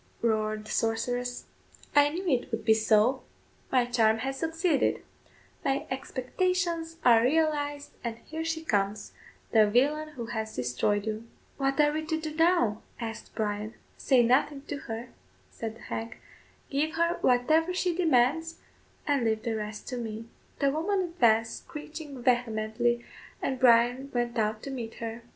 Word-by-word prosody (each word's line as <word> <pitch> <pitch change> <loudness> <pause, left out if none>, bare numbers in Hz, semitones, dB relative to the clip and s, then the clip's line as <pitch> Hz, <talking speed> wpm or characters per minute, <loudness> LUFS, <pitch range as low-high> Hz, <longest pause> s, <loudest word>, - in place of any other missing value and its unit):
roared 215 -1 0
the - - -8
sorceress, 245 +2 -1 0.5
"I 290 0 +6
knew 360 +5 -4
it 255 -4 +1
would 225 -1 -3
be 220 - +6
so; 220 +4 +3 0.5
my 250 -2 +4
charm 225 -2 +3
has 270 0 -3
succeeded; 325 -1 +1 0.6
my 275 -2 0
expectations 330 +5 -1
are 230 -2 +7
realised, 290 +1 +1
and 230 -2 -3
here 320 +1 -4
she 325 0 -2
comes, 205 -5 -1 0.4
the 215 -2 +5
villain 290 +7 +2
who 240 -5 -5
has 220 -1 -3
destroyed 125 - 0
you." 220 +1 -4 0.3
"What 275 0 0
are 295 0 +5
we 310 +1 -2
to 320 0 0
do 310 -1 -5
now?" 325 - +3 0.2
asked 225 -2 -6
Bryan. 210 0 -2 0.2
"Say 255 -3 +3
nothing 275 +4 +2
to 290 - -2
her," 230 -2 -6 0.4
said 225 -1 -5
the 235 - -16
hag; 225 +1 -5 0.5
"give 305 +3 0
her 335 +1 +1
whatever 310 +8 +3
she 365 -1 0
demands, 325 0 +2 0.5
and 285 -4 +1
leave 220 -1 0
the 230 -1 -1
rest 210 -1 -5
to 250 - -3
me." 225 -1 -5 0.3
The 280 -1 +2
woman 375 +7 0
advanced 225 -7 +3
screeching 300 -3 -8
vehemently, 235 0 +1 0.3
and 260 -1 -2
Bryan 245 +2 +4
went 240 -1 -1
out 215 0 0
to 275 - -5
meet 235 -4 -5
her. 230 0 -6
245 Hz, 155 wpm, -28 LUFS, 225-305 Hz, 0.6 s, are